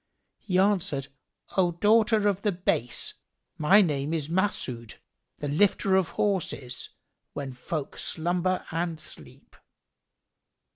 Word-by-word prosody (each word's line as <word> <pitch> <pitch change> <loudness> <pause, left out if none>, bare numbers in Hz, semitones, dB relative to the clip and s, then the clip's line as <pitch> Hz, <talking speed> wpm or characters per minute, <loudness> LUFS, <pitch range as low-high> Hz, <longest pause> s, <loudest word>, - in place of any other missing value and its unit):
He 185 -3 -1
answered, 190 -8 +1 0.5
"O 175 -2 +3
daughter 215 +3 +4
of 200 -1 +1
the 210 - +1
base, 125 -10 0 0.5
my 195 +7 +6
name 150 -1 -1
is 155 -2 -3
Mas'ъd, 140 - -1 0.4
the 145 - -4
lifter 190 +5 +3
of 190 -3 +2
horses, 165 -11 -1 0.4
when 135 -2 -5
folk 140 +3 -5
slumber 175 +2 -1
and 165 -1 -2
sleep." 115 - -9
170 Hz, 110 wpm, -27 LUFS, 145-195 Hz, 0.5 s, my